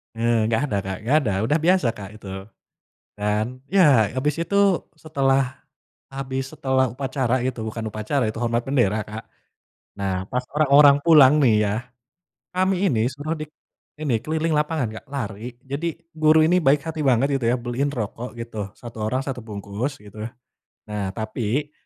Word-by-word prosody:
Eee, 115 Hz, -1 st, +2 dB
gak 110 Hz, -, +2 dB
ada 100 Hz, -, +1 dB
Kak, 95 Hz, -1 st, -4 dB
gak 145 Hz, +5 st, +4 dB
ada -, -, +1 dB
udah 150 Hz, +8 st, +2 dB
biasa 175 Hz, -4 st, +3 dB
Kak, 100 Hz, -4 st, -9 dB
itu, 105 Hz, -2 st, -12 dB, 0.9 s
dan 105 Hz, +1 st, 0 dB, 0.2 s
ya 140 Hz, -, +4 dB
abis 145 Hz, +3 st, +1 dB
itu 200 Hz, -, -3 dB, 0.4 s
setelah, 140 Hz, -4 st, +1 dB, 0.7 s
habis 135 Hz, -1 st, -3 dB
setelah 130 Hz, -3 st, +1 dB
upacara 130 Hz, -1 st, -1 dB
itu 130 Hz, -, -4 dB
bukan 110 Hz, 0 st, -4 dB
upacara 110 Hz, +6 st, -1 dB
itu 110 Hz, -, -3 dB
hormat 115 Hz, 0 st, +1 dB
bendera 120 Hz, -6 st, +2 dB
Kak, 110 Hz, +2 st, -7 dB, 0.8 s
nah 95 Hz, -2 st, -1 dB
pas 125 Hz, -1 st, 0 dB
orang-orang 145 Hz, -1 st, +7 dB
pulang 150 Hz, -5 st, +7 dB
nih 120 Hz, -, +5 dB
ya, 100 Hz, -, 0 dB, 0.8 s
kami 185 Hz, +1 st, +1 dB, 0.2 s
ini 115 Hz, -2 st, +1 dB
suruh 145 Hz, +5 st, -3 dB
dik 155 Hz, -, -5 dB, 0.6 s
ini 140 Hz, -6 st, 0 dB
keliling 155 Hz, +6 st, -2 dB
lapangan 150 Hz, -4 st, 0 dB
Kak, -, -, -19 dB
lari 120 Hz, -3 st, -5 dB, 0.2 s
jadi 145 Hz, +5 st, -2 dB, 0.3 s
guru 155 Hz, 0 st, +5 dB
ini 175 Hz, +3 st, +3 dB
baik 145 Hz, -3 st, +3 dB
hati 160 Hz, 0 st, -4 dB
banget 130 Hz, 0 st, +4 dB
gitu 120 Hz, -, -2 dB
ya 120 Hz, -, +3 dB
beliin 125 Hz, +3 st, -1 dB
rokok 120 Hz, +1 st, -5 dB
gitu 115 Hz, -1 st, -8 dB, 0.2 s
1 120 Hz, -2 st, -11 dB
orang 130 Hz, +4 st, 0 dB
1 135 Hz, -2 st, -4 dB
bungkus 105 Hz, +5 st, -5 dB
gitu, 105 Hz, +1 st, -7 dB, 0.6 s
nah 105 Hz, -2 st, -3 dB
tapi, 115 Hz, +6 st, -2 dB
130 Hz, 160 wpm, -23 LUFS, 110-145 Hz, 0.9 s, orang-orang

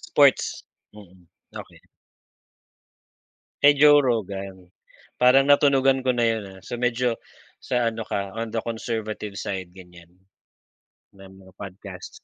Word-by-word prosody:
Sports. -, -, +3 dB, 0.3 s
Mm, 95 Hz, -4 st, -16 dB, 0.3 s
okey. -, -, -11 dB, 1.8 s
Kay 145 Hz, 0 st, +6 dB
Joe 145 Hz, 0 st, +7 dB
Rogan 100 Hz, -6 st, -3 dB, 0.6 s
parang 135 Hz, +2 st, +6 dB
natunugan 135 Hz, -2 st, +4 dB
ko 130 Hz, -, +1 dB
na 120 Hz, -2 st, +1 dB
yun, 115 Hz, -2 st, 0 dB, 0.2 s
ah, -, -, -16 dB
so, -, -, -5 dB
medyo 120 Hz, 0 st, 0 dB, 0.5 s
sa 125 Hz, -2 st, 0 dB
ano 115 Hz, -, -5 dB
ka, 100 Hz, -2 st, -4 dB
on 115 Hz, 0 st, -4 dB
the 115 Hz, -, -3 dB
conservative 110 Hz, -2 st, -5 dB
side 95 Hz, -4 st, -5 dB
gan'yan. 90 Hz, -2 st, -16 dB, 1.0 s
Na 95 Hz, -1 st, -15 dB
mga 95 Hz, -1 st, -17 dB
podcast. 95 Hz, -1 st, -10 dB
110 Hz, 125 wpm, -24 LUFS, 95-125 Hz, 1.8 s, Joe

